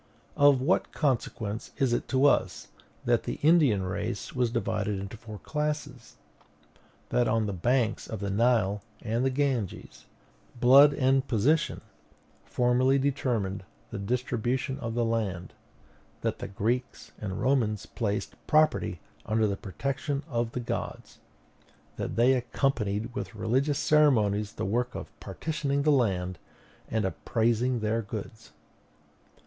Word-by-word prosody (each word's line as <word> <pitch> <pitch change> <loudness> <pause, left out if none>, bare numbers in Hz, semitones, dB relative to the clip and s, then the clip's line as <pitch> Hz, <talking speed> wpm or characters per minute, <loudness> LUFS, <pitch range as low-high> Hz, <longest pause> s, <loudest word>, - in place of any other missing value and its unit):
Of 145 -2 +5
what 160 +8 +1
consequence 115 -6 -2
is 130 -3 +2
it - - -1
to 135 +1 +2
us 145 - +2 0.4
that - - +3
the - - -2
Indian 145 - +4
race 95 +2 -4
was 125 -2 +1
divided 105 -3 -1
into 100 +3 -6
four 110 -1 -9
classes; 150 -3 -4 0.9
that, 120 -1 +2
on 110 0 +1
the 100 - -2
banks 120 +5 0
of 110 - -5
the 100 0 -3
Nile 105 -2 +2 0.2
and 115 +3 0
the 135 - +3
Ganges, 130 -7 -2 0.5
blood 135 +4 +8
and 135 0 +2
position 140 +8 +1 0.6
formerly 125 +2 +2
determined 120 -8 -1 0.3
the - - -4
distribution 125 +4 -1
of 115 -1 -4
the 120 -1 +1
land; 105 -6 -2 0.7
that - - -2
the - - -5
Greeks 115 +5 -2
and 95 -3 -4
Romans 115 -6 +1
placed 100 -3 -3
property 155 0 +2 0.3
under 110 0 +2
the 100 -2 0
protection 140 +8 -3
of 120 -5 -2
the - - -2
gods; 120 - -5 0.8
that - - -3
they 120 +3 +5
accompanied 120 -3 -1
with 120 - -5
religious 130 +7 +1
ceremonies 110 -11 +3
the - - -4
work 120 +5 -1
of - - -7
partitioning 145 -3 -2
the 150 - +4
land 95 - +1 0.5
and 110 -2 0
appraising 115 +4 0
their 110 +2 0
goods? 110 +1 -8
120 Hz, 130 wpm, -28 LUFS, 105-135 Hz, 0.9 s, blood